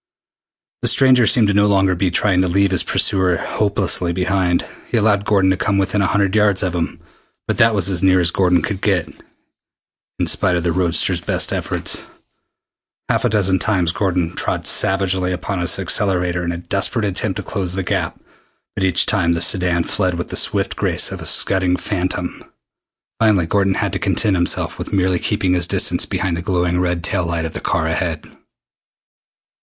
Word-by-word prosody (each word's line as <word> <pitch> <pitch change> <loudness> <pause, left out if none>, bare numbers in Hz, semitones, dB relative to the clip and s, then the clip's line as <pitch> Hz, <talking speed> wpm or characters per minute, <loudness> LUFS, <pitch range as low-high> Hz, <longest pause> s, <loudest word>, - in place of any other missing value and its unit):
The - - 0
stranger 130 -3 +4
seemed 105 -4 +3
no 105 0 +4
longer 95 -2 +2
to - - 0
be 90 +1 0
trying 90 +1 +2
to 95 - +1
leave 100 +2 +1
his 95 - +3
pursuer 90 -3 +1
hopelessly 100 -4 -1
behind. 90 -1 0 0.2
He - - 0
allowed 105 -2 +2
Gordon 95 -3 +2
to 95 - 0
come 100 0 0
within 100 +1 0
a 100 - +1
hundred 100 +1 0
yards 105 -2 +2
of 90 -2 -1
him. 85 -2 -3 0.5
But - - -2
that 115 -1 +4
was 95 -3 +1
as 95 -3 0
near 95 -1 +4
as 85 -1 +3
Gordon 90 -2 +2
could 100 -2 -4
get, 95 -5 0 1.1
is - - +1
spite 90 - 0
of 85 - -1
the 85 - 0
roadster's 85 -1 0
best - - -1
efforts. - - -2 1.1
Half - - +1
a - - +2
dozen 95 -3 +1
times 90 -6 +1
Gordon 90 -4 -1
trod - - -2
savagely 95 -1 +1
upon 90 +1 -4
his 90 0 +1
accelerator 90 -2 -1
in 85 - -2
a 85 - -4
desperate 100 +5 -1
attempt 95 0 -2
to - - -5
close 95 -4 -3
the 95 0 -2
gap, - - -3 0.5
but 95 - -3
each 95 -2 +3
time 85 -5 +1
the 85 - -1
sedan 90 -1 +2
fled 90 +1 -1
with 85 - -5
the - - -5
swift - - +1
grace - - 0
of - - -7
a - - -4
scudding 90 -2 +2
phantom. 90 -2 -3 0.8
Finally 105 -6 +3
Gordon 95 +2 +1
had - - -2
to - - -2
content 105 -3 +1
himself 85 -1 -1
with - - -6
merely 95 -2 +1
keeping 100 -2 0
his 90 -1 0
distance - - +1
behind 90 -2 -2
the - - -4
glowing 90 0 0
red 90 -2 -1
tail 85 +1 -1
light 85 -1 -2
of 80 - -6
the - - -6
car 80 - -1
ahead. 80 0 -2
95 Hz, 190 wpm, -18 LUFS, 90-100 Hz, 1.1 s, stranger